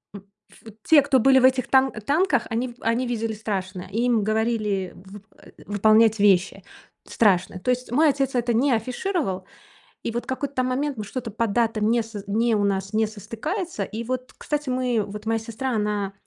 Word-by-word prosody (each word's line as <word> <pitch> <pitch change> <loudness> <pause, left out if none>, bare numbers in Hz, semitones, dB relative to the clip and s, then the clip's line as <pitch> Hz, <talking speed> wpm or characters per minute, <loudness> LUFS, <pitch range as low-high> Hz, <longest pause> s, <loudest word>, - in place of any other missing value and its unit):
м, 195 - -9 0.3
в 225 - -15
те, 305 -3 +6
кто 270 -2 +2
были 265 +2 +5
в - - 0
этих 255 -1 +3
тан 265 0 +4
танках, 290 - 0
они 235 +3 -1
ви 240 - -11
они 235 +3 0
видели 225 -2 -2
страшное. 190 -4 -4
И 225 +4 -1
им 235 -4 +2
говорили 215 -3 -1
вып 195 +2 -13
э, - - -17 0.2
выполнять 215 +2 +4
вещи 200 -2 +3 0.4
страшные. 185 -4 +1
То 250 - 0
есть 250 -1 -3
мой 300 +5 +4
отец 270 -1 -1
это 240 -1 +1
не 265 +5 +2
афишировал, 245 - -2 0.6
и - - -2
вот 240 +1 -4
какой-то 280 +1 -4
там 255 0 +1
момент, 275 +1 -2
мы 215 - -4
что-то 225 +2 -6
по 230 +2 -1
датам 220 0 +1
не 235 0 +2
сз 220 -3 -8
не 225 +3 +1
у 205 - +1
нас 195 0 -1
не 220 0 +2
состыкуется. 300 - -4
И 225 +2 -5
вот, 255 +1 -4
кстати, 295 -2 -3
мы, 250 -3 0
вот 210 +1 -9
моя 225 0 0
сестра, 230 +4 -4
она 210 -2 -1
230 Hz, 195 wpm, -24 LUFS, 210-255 Hz, 0.6 s, те